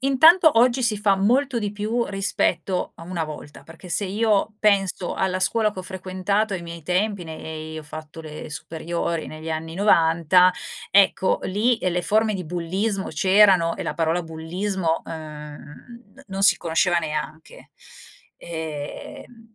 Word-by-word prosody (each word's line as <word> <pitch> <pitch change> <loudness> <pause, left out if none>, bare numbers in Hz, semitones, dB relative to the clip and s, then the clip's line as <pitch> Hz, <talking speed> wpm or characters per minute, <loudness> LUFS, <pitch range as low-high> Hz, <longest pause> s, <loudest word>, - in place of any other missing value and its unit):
intanto 315 +2 +6
oggi 250 +2 +3
si 225 -3 +2
fa 205 -2 +3
molto 245 +7 +1
di 205 -1 -2
più 215 +3 -1
rispetto 195 -1 0
a - - -12
una 170 0 -4
volta, 150 -1 -10
perché 165 +3 -13
se 200 - 0
io 210 +1 +1
penso 195 -4 +1
alla 185 -1 0
scuola 215 +3 +2
che 190 - -11
ho - - -9
frequentato 190 +3 -2
ai 175 - -5
miei 170 -1 -8
tempi, 185 +4 0
nei 160 0 -7
ho - - -8
fatto 155 +1 -9
le 155 -1 -9
superiori 165 +1 -4
negli 155 +1 -8
anni 160 +1 -4
90 175 -2 +4 0.4
ecco 195 -1 +4
lì, 220 +6 +1
ehm, 185 -5 -1
le 180 - -1
forme 215 +3 +2
di 185 -2 -4
bullismo 190 +5 -2
c'erano 185 0 +4
e - - -4
la - - -3
parola 165 +1 0
bullismo, 165 +2 -2
ehm, 155 +8 -10
non 195 0 -4
si - - +6
conosceva 170 +1 +1
neanche. 155 0 -6 0.7
Ehm, 165 +8 -8
185 Hz, 150 wpm, -23 LUFS, 160-210 Hz, 0.7 s, intanto